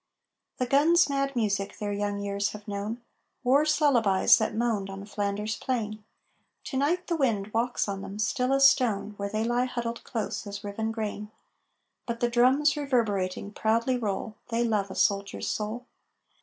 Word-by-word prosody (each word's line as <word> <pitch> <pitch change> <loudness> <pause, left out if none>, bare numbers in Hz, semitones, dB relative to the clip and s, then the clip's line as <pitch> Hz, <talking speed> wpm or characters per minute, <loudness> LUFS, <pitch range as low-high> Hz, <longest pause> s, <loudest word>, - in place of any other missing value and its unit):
The 255 - 0
guns' 300 +5 +4
mad 275 0 -1
music 200 -4 -1
their 205 -1 -3
young 205 0 -2
years 200 0 -2
have 210 0 -10
known 210 +4 -4 0.4
War's 290 +5 +3
lullabies 230 -11 +5
that 220 - -1
moaned 220 -4 0
on 195 +1 -7
Flanders 205 +1 -2
Plain; 215 -5 -3 0.6
To 265 - -4
night 335 +7 +1
the 340 - -1
wind 215 -9 0
walks 235 +1 0
on 195 -1 -3
them, 195 +1 -7
still 250 +5 0
as 275 0 +7
stone, 210 -6 +1
Where 200 0 -3
they 215 +1 -1
lie 240 +2 +1
huddled 235 -2 -4
close 220 -1 -4
as 200 0 -6
riven 220 +2 -3
grain. 210 -2 -4 0.8
But 235 -1 -3
the 240 - +1
Drums, 265 +5 +4
reverberating, 210 -9 -1
proudly 230 +4 +1
roll 215 -2 -3 0.2
They 230 0 +1
love 210 -4 0
a - - -7
Soldier's 200 0 0
soul! 220 +4 -3
220 Hz, 165 wpm, -27 LUFS, 205-250 Hz, 0.8 s, as